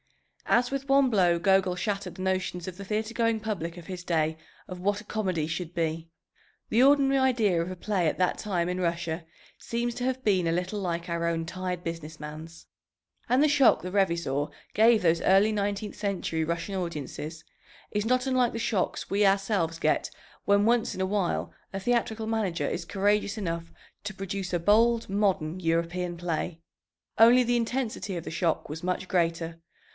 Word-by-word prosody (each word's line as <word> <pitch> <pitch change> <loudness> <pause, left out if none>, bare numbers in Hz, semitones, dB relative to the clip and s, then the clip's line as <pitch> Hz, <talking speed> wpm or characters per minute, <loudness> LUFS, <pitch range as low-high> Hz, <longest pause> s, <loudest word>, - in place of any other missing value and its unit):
As 245 +1 +3
with 275 0 -4
one 275 -1 +5
blow, 180 -6 +3
Gogol 190 0 +3
shattered 195 -2 -3
the - - -8
notions 185 -2 -1
of 185 - -5
the 200 - -8
theatre 215 +3 -2
going 230 -1 +1
public 185 -6 -4
of 175 - -10
his 180 0 -6
day 160 -2 0 0.3
of 180 -1 -7
what 205 +2 +1
a 210 - -12
comedy 185 -8 -1
should 165 +1 -4
be. 165 -1 -2 0.6
The 230 - +3
ordinary 275 -1 +5
idea 225 -10 +2
of 175 +2 -4
a - - -5
play 185 -2 0
at - - 0
that 180 -1 +1
time 180 -5 -1
in 180 +1 -2
Russia 170 -1 -2 0.4
seems 235 +1 -2
to 245 - -4
have 260 0 -1
been 185 -5 +3
a - - +2
little 180 +4 -2
like 170 -2 -2
our 170 -1 -1
own 165 -1 -1
tired 180 0 -4
business 165 -1 -6
man's. 155 +2 -9 0.6
And 255 +3 +4
the 305 - +5
shock 285 -4 +5
the 180 - -5
Revizor 170 -7 0 0.2
gave 225 -1 +5
those 165 -1 +3
early 195 +3 +4
nineteenth 205 0 -2
century 190 -5 -2
Russian 170 +4 -3
audiences 160 -2 -5 0.5
is 210 0 -1
not 255 +2 +1
unlike 255 -2 +2
the 230 - -4
shocks 210 -4 -1
we 205 +1 +3
ourselves 195 -4 +1
get - - +1 0.3
when 200 0 +3
once 235 0 +2
in - - -7
a 190 - +1
while 190 -2 -1 0.2
a 195 - -4
theatrical 225 0 0
manager 210 -7 -1
is 170 - -3
courageous 205 +2 +1
enough 165 -4 -4 0.3
to 205 -1 -5
produce 195 -1 -4
a 175 - +1
bold 230 +5 +3
modern 190 -4 0
European 170 +1 -1
play. 170 -1 -3 0.6
Only 240 +3 +7
the 240 0 +1
intensity 230 -5 -2
of 165 - -5
the - - -5
shock 165 0 0
was 160 +3 -7
much 180 +1 -2
greater. 165 -2 -1
190 Hz, 185 wpm, -27 LUFS, 170-215 Hz, 0.6 s, Only